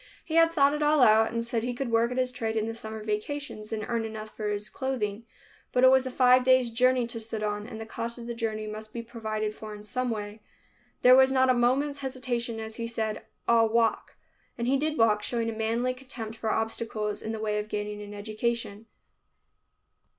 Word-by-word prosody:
He 315 - -6
had 330 0 +5
thought 285 -3 +4
it 300 - -2
all 300 -1 +4
out 220 0 +5
and 230 0 -2
said 235 -1 -1
he 245 +1 -3
could 250 -1 -3
work 230 +1 +3
at 250 - -4
his 255 -1 +1
trade 225 -3 -3
in 220 -1 +1
the 225 - -3
summer 220 -1 -7
vacations 215 +1 -4
and 215 -1 -3
earn 235 -1 -1
enough 220 -1 -7
for 210 -1 -3
his 205 0 -3
clothing. 230 -5 -3 0.4
But 250 - +2
it 260 - +8
was 265 0 +4
a - - -2
five 255 0 +5
days' 255 -2 +4
journey 250 +1 +3
to 230 0 -5
Sidon, 215 -1 -3
and 220 -2 -8
the 225 - -6
cost 230 +2 -4
of 235 - -8
the 235 - -4
journey 220 -2 -3
must 215 0 -7
be 235 - -4
provided 215 -2 -3
for 215 0 -8
in 210 - -11
some 250 +4 -2
way. 210 -1 -5 0.6
There 250 +1 +9
was 265 0 +6
not 260 -1 +4
a - - +4
moment's 265 +4 +1
hesitation 250 -4 -2
as 220 0 -6
he 230 -1 -3
said, 220 -2 -3 0.3
"I'll 230 -1 +5
walk." 230 0 +1 0.4
And 235 - -2
he 260 +3 +3
did 305 +2 0
walk, 215 -2 +4
showing 230 +1 -1
a - - -6
manly 230 +3 0
contempt 250 -4 -8
for 225 -1 -3
obstacles 220 -2 -2
in 220 - -4
the 220 - -4
way 210 -1 -1
of 210 0 -5
gaining 210 0 -4
an 205 0 -8
education. 215 +1 -3
230 Hz, 220 wpm, -28 LUFS, 215-255 Hz, 0.6 s, There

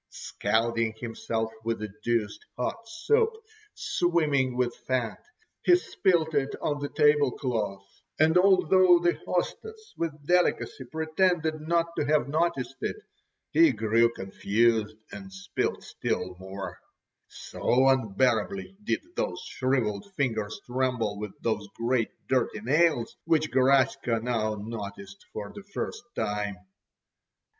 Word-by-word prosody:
Scalding 115 +1 -1
himself 110 -1 -3
with 115 0 -1
the 105 -2 -6
deuced 115 -3 -1
hot 225 - -3
soup, 440 - +2 0.4
swimming 150 -8 +1
with 125 -1 0
fat, 125 -4 -2 0.4
he 355 - +6
spilt 175 - +1
it 140 -1 0
on 145 -1 -1
the 145 0 -3
table 150 -2 +4
cloth, 105 -6 -3 0.3
and 160 +2 +4
although 185 -1 +6
the 175 0 +2
hostess 440 - -3
with 155 -3 -4
delicacy 175 -5 +1
pretended 160 +2 0
not 170 +1 0
to - - 0
have 150 -3 +2
noticed 140 -4 -1
it, - - -2 0.6
he 330 -1 +6
grew 115 +2 +3
confused 110 +2 +1 0.2
and 195 0 -9
spilt 195 +1 -3
still 90 0 -3
more; 95 +1 -7 0.5
so 130 +2 0
unbearably 130 - +1
did - - 0
those - - -2
shrivelled 130 - -1
fingers 110 - -1
tremble 125 -5 -1
with 105 -2 -5
those 110 -3 -1
great 115 -1 +1 0.2
dirty 125 -4 +1
nails, 145 0 +2
which 155 -2 +2
Garaska 130 -3 +3
now 110 -3 0
noticed 100 -2 -8
for 105 -1 -6
the 205 - -9
first 200 0 -5
time. 105 -1 -2
130 Hz, 120 wpm, -27 LUFS, 110-170 Hz, 0.6 s, he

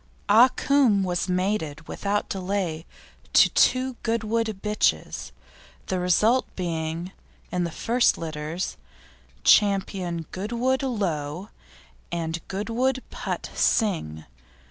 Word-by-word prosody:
Ah 225 +5 +8
Cum 255 -9 +3
was 180 0 -1
mated 180 -5 -1
without 205 +1 -2
delay 185 -4 -3 0.5
to - - +7
two 255 -1 +2
Goodwood 225 0 0 0.2
bitches, 210 0 0 0.5
the 185 - -1
result 210 +8 +3
being, 165 0 -3 0.4
in 180 -1 0
the - - -2
first 235 +8 +2
litters, 160 +2 -4 0.7
Ch. - - +8 0.7
Goodwood 240 +7 -1
Lo 185 - -2 0.6
and 165 -1 -3
Goodwood 240 +6 -1
Put - - -4
Sing. 160 - 0
195 Hz, 100 wpm, -25 LUFS, 170-230 Hz, 0.7 s, Ah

